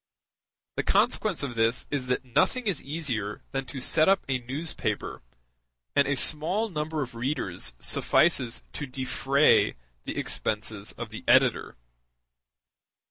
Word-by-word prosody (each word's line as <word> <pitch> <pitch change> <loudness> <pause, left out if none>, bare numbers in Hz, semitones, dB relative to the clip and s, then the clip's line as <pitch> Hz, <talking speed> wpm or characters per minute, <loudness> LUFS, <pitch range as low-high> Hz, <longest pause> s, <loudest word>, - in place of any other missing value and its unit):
The - - 0
consequence 200 -8 +2
of 135 -4 -3
this 115 +1 +1
is 140 -3 -2
that 125 +1 -1
nothing 245 - +1
is 195 -8 0
easier 125 -9 -3
than 135 -1 -3
to 135 - -6
set 155 +6 +3
up 195 -1 +3
a 130 -2 0
newspaper, 125 -4 -4 0.7
and 140 - +4
a 140 - +1
small 170 +11 +1
number 155 -3 -2
of 125 - -9
readers 115 - -2
suffices 130 - +2
to 145 - -4
defray 135 +2 +2 0.3
the - - -5
expenses 105 -1 -2
of - - -7
the - - -8
editor. - - +3
135 Hz, 135 wpm, -27 LUFS, 120-155 Hz, 0.7 s, and